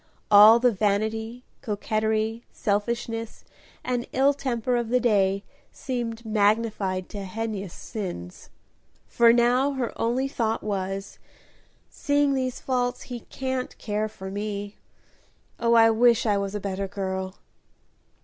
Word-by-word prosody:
All 210 Hz, +2 st, +9 dB
the 245 Hz, +1 st, +3 dB
vanity, 220 Hz, +3 st, -1 dB, 0.2 s
coquetry, 220 Hz, +2 st, -1 dB
selfishness, 225 Hz, +2 st, -2 dB, 0.4 s
and 245 Hz, -1 st, -2 dB
ill 275 Hz, +2 st, +4 dB
temper 250 Hz, -3 st, -1 dB
of 240 Hz, -2 st, -1 dB
the 250 Hz, +1 st, +3 dB
day 200 Hz, -4 st, +2 dB, 0.3 s
seemed 235 Hz, -3 st, -4 dB
magnified 210 Hz, -3 st, +1 dB
to 200 Hz, -1 st, -6 dB
heinous 200 Hz, -2 st, -5 dB
sins, 180 Hz, -, -7 dB, 0.6 s
for 235 Hz, -1 st, +5 dB
now 245 Hz, +4 st, +3 dB
her 255 Hz, -3 st, -3 dB
only 245 Hz, +4 st, +1 dB
thought 225 Hz, -4 st, -1 dB
was, 195 Hz, -1 st, -4 dB, 0.7 s
"seeing 285 Hz, -2 st, +1 dB
these 255 Hz, -2 st, -2 dB
faults, 245 Hz, -1 st, -1 dB
he 245 Hz, -2 st, -6 dB
can't 260 Hz, +1 st, -4 dB
care 215 Hz, 0 st, -2 dB
for 190 Hz, -2 st, -8 dB
me. 205 Hz, 0 st, -4 dB, 0.8 s
Oh, 235 Hz, 0 st, +3 dB
I 225 Hz, 0 st, +7 dB
wish 235 Hz, +1 st, +4 dB
I 210 Hz, -2 st, +3 dB
was 200 Hz, 0 st, -2 dB
a -, -, -1 dB
better 195 Hz, 0 st, -3 dB
girl!" 190 Hz, -1 st, -4 dB
220 Hz, 125 wpm, -25 LUFS, 200-240 Hz, 0.8 s, All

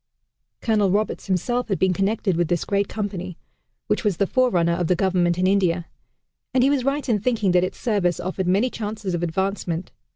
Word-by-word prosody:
Colonel 210 Hz, -4 st, +2 dB
Roberts 210 Hz, +3 st, -1 dB
himself 240 Hz, +7 st, 0 dB
had 195 Hz, -4 st, 0 dB
been 190 Hz, -1 st, +2 dB
connected 195 Hz, 0 st, 0 dB
with 170 Hz, 0 st, +1 dB
this 175 Hz, 0 st, -1 dB
great 200 Hz, 0 st, 0 dB
company, 190 Hz, -4 st, -5 dB, 0.5 s
which -, -, 0 dB
was 205 Hz, -6 st, +1 dB
the 200 Hz, -, +2 dB
forerunner 190 Hz, -8 st, +2 dB
of 175 Hz, -1 st, -1 dB
the 180 Hz, -, +3 dB
Government 175 Hz, -2 st, +1 dB
in 185 Hz, -, +1 dB
India 185 Hz, -3 st, +2 dB, 0.7 s
and 255 Hz, -, +4 dB
he 275 Hz, -, +4 dB
was 275 Hz, -3 st, +1 dB
right 275 Hz, +2 st, -1 dB
in 225 Hz, -4 st, +2 dB
thinking 215 Hz, -3 st, +1 dB
that 180 Hz, 0 st, +4 dB
its 185 Hz, -, -3 dB
service 195 Hz, -8 st, 0 dB
offered 185 Hz, 0 st, -3 dB
many 205 Hz, +8 st, +2 dB
chances 210 Hz, -3 st, -4 dB
of 175 Hz, -, -1 dB
advancement. 175 Hz, 0 st, -2 dB
195 Hz, 195 wpm, -23 LUFS, 180-215 Hz, 0.7 s, and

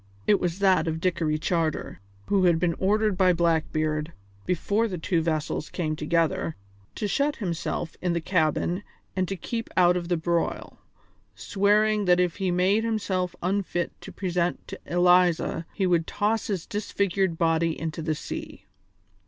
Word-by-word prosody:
It 205 Hz, -, +4 dB
was 175 Hz, -1 st, -1 dB
that 190 Hz, -3 st, +3 dB
of 160 Hz, 0 st, -1 dB
Dickory 165 Hz, -3 st, 0 dB
Charter, 160 Hz, 0 st, -1 dB, 0.3 s
who 195 Hz, -2 st, +2 dB
had 170 Hz, -2 st, +4 dB
been 170 Hz, 0 st, +1 dB
ordered 210 Hz, +1 st, +2 dB
by 185 Hz, -1 st, +4 dB
Blackbeard, 155 Hz, -2 st, 0 dB, 0.4 s
before 200 Hz, +5 st, +1 dB
the 185 Hz, -4 st, -4 dB
two 170 Hz, 0 st, 0 dB
vessels 155 Hz, -1 st, -2 dB
came 155 Hz, -4 st, -2 dB
together, 165 Hz, +2 st, 0 dB, 0.4 s
to 210 Hz, -, -2 dB
shut 285 Hz, +8 st, +1 dB
himself 170 Hz, -3 st, -3 dB
in 180 Hz, -2 st, 0 dB
the 170 Hz, -, 0 dB
cabin 170 Hz, +1 st, 0 dB, 0.3 s
and 185 Hz, -1 st, 0 dB
to 195 Hz, -, -3 dB
keep 230 Hz, +5 st, -4 dB
out 180 Hz, -1 st, +5 dB
of 175 Hz, -1 st, -3 dB
the 175 Hz, -1 st, +1 dB
broil, 170 Hz, +1 st, -2 dB, 0.6 s
swearing 210 Hz, +1 st, +2 dB
that 180 Hz, -1 st, +4 dB
if 180 Hz, -2 st, +1 dB
he 190 Hz, -2 st, 0 dB
made 185 Hz, +5 st, +2 dB
himself 190 Hz, -5 st, -1 dB
unfit 180 Hz, -2 st, -1 dB
to -, -, -9 dB
present 180 Hz, -2 st, -2 dB
to -, -, -7 dB
Eliza 175 Hz, -2 st, +3 dB
he 195 Hz, -, -1 dB
would 170 Hz, -3 st, +2 dB
toss 215 Hz, +1 st, 0 dB
his 190 Hz, -5 st, -2 dB
disfigured 200 Hz, -4 st, -1 dB
body 165 Hz, 0 st, +1 dB
into 160 Hz, 0 st, -4 dB
the 155 Hz, -1 st, -1 dB
sea. -, -, -7 dB
180 Hz, 160 wpm, -26 LUFS, 165-195 Hz, 0.6 s, out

